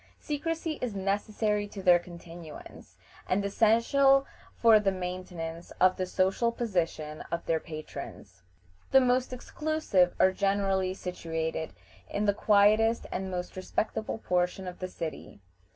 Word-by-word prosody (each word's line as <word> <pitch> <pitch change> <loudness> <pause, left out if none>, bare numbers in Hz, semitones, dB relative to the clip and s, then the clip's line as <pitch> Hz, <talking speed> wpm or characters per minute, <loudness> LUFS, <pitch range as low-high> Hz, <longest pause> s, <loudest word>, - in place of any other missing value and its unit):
Secrecy 320 +1 -3
is 235 -5 -3
necessary 205 +2 -1
to 200 -1 -9
their 175 -2 +6
continuance, 170 -2 -11 0.3
and 200 +2 +1
essential 250 +7 +4 0.3
for 225 -2 +5
the 200 -2 +1
maintenance 180 -2 -5
of 185 0 +5
the 185 - -2
social 190 +6 +1
position 165 -9 -2
of 170 0 -3
their 165 -1 +1
patrons. 155 - -9 0.5
The 265 - +7
most 255 0 +2
exclusive 255 - 0
are 190 - +5
generally 195 -1 0
situated 160 -3 -4 0.4
in 205 +1 -1
the 205 - +3
quietest 215 +3 +4
and 190 +1 -3
most 180 -1 -5
respectable 215 +4 -2
portion 180 -2 -1
of 180 - -7
the 185 - -3
city. 165 - -7
190 Hz, 130 wpm, -29 LUFS, 180-220 Hz, 0.5 s, The